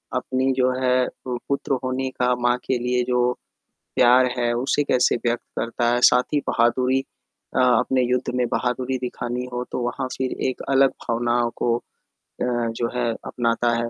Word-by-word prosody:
अपनी 130 +1 0
जो 130 0 +3
है 125 0 +3
अ, - - -4 0.2
पुत्र 135 +2 -2
होने 130 +1 -1
का 125 0 +3
माँ 120 0 +1
के 130 - +1
लिए 125 +1 0
जो 125 0 +2 0.7
प्यार 125 +1 +6
है, 120 -1 +1
उसे 130 +4 +1
कैसे 125 -3 +2
व्यक्त 120 0 0 0.2
करता 120 0 -1
है, 120 - +1
साथ 125 - +6
ही 145 - +3
बहादुरी 125 +3 +2 0.6
अ, 130 - +4
अपने 125 +1 +3
युद्ध 125 0 0
में 125 -1 +1
बहादुरी 130 +1 -1
दिखानी 125 0 -4
हो 125 0 -3
तो - - -2
वहाँ 125 +2 -2
फिर 130 -1 -2 0.2
एक 130 - -7
अलग 135 0 +4 0.2
भावनाओं 120 0 +1
को 115 -1 +1
अ, - - -17 0.6
जो 120 -1 -1
है 120 -1 0
अपनाता 120 0 0
है, 115 0 -2
125 Hz, 175 wpm, -23 LUFS, 120-130 Hz, 0.7 s, प्यार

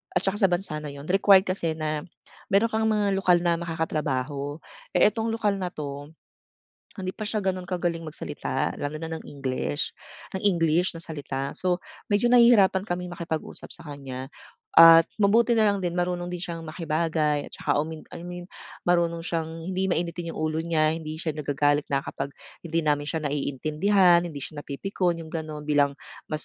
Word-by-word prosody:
at - - +2
saka 195 +2 +1
sa 195 - +5
bansa 175 -4 -2
na 150 - -7
iyon 140 0 -9
required 195 0 +6
kasi 170 -4 -1
na 155 -1 -2 0.4
meron 215 +4 +3
kang 220 0 +1
mga 205 -2 +2
lokal 180 -2 +4
na 170 -1 +2
makakatrabaho. 150 -3 -2 0.4
Eh - - +6
itong 225 0 -2
lokal 210 -3 0
na, 185 - -2
ito 145 -1 -6 0.9
hindi 185 -2 -4
pa 215 - -4
siya 215 0 -1
ganun 185 -2 -1
kagaling 175 -2 -1
magsalita 145 -3 -3
lalo 145 +1 -3
na 165 - -4
ng - - -10
English 140 +1 -3 0.4
ng 190 - -5
English 170 -2 +3
na 165 - -7
salita 140 -4 -5
so 180 -1 0 0.3
medyo 205 +3 +3
nahihirapan 235 -6 +6
kaming 180 -2 -3
makipag 165 -2 -3
usap - - -10
sa 160 - -7
kanya 135 -2 -7 0.5
at 165 0 +10
mabuti 220 +3 +4
nalang 205 -3 +3
din 175 -1 -2
marunong 175 0 -1
din - - -2
siyang 170 -1 -4
makibagay 155 -2 0
at - - -38
saka, - - 0
um, 155 +2 -3 0.2
I - - -7
mean 175 0 -7 0.4
marunong 170 -1 +2
siyang 165 -1 -3
hindi 190 +2 -1
mainitin 170 -1 -2
yung - - -6
ulo 155 0 0
niya, 160 -2 +2
hindi 155 -1 -6
siya 160 -2 -1
nagagalit 145 0 +1
na 140 -1 +1
kapag 135 - -4 0.4
hindi 165 0 0
namin 145 -1 +1
siya 160 -1 -2
naiintindihan, 155 +6 +3
hindi 145 -4 -7
siya 145 +2 -6
napipikon, 175 +4 -1
yung 160 - -8
ganun 155 -2 -5
bilang 145 -1 +3 0.4
mas 155 -1 +2
165 Hz, 175 wpm, -26 LUFS, 150-185 Hz, 0.9 s, at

